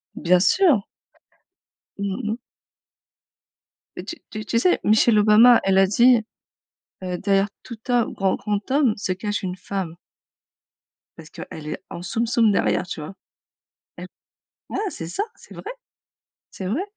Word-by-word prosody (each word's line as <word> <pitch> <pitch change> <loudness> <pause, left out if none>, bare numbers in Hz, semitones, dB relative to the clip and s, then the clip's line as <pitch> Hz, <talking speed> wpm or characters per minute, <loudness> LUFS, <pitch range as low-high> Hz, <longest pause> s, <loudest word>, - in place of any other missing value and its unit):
Bien 180 +1 +3
sûr. 280 - +3 1.1
Mmh 200 -1 -2
mh. 215 +2 -2 1.6
Heu, - - -5
tu 335 - -6 0.2
tu 215 0 -5
tu 230 - 0
sais, 360 - +2
Michelle 215 +1 +4
Obama, 220 +3 +7
elle 195 0 +2
a 195 - +6
dit, 240 +4 +5 0.9
heu: 180 -1 -3
«derrière 195 0 +1
tout 235 - -9
homme, 240 -2 +2
grand 195 -1 0
grand 210 +2 -3
homme 270 -6 +3
se 200 -3 -2
cache 205 +2 -3
une 185 -1 -4
femme» 185 -3 -5 1.2
parce 160 -2 -13
qu'elle 150 -1 -9
est - - -6
en 170 - -7
soum 230 +6 -2
soum 225 -2 +3
derrière, 190 - +1
tu 165 - -6
vois? 190 +6 -8 0.8
Elle - - -8 0.6
ouais, - - -4
c'est 165 - -7
ça, 400 - -2
c'est - - -16
vrai. - - -7 0.8
C'est 190 - -7
vrai. 250 - -1
205 Hz, 150 wpm, -22 LUFS, 185-235 Hz, 1.6 s, Obama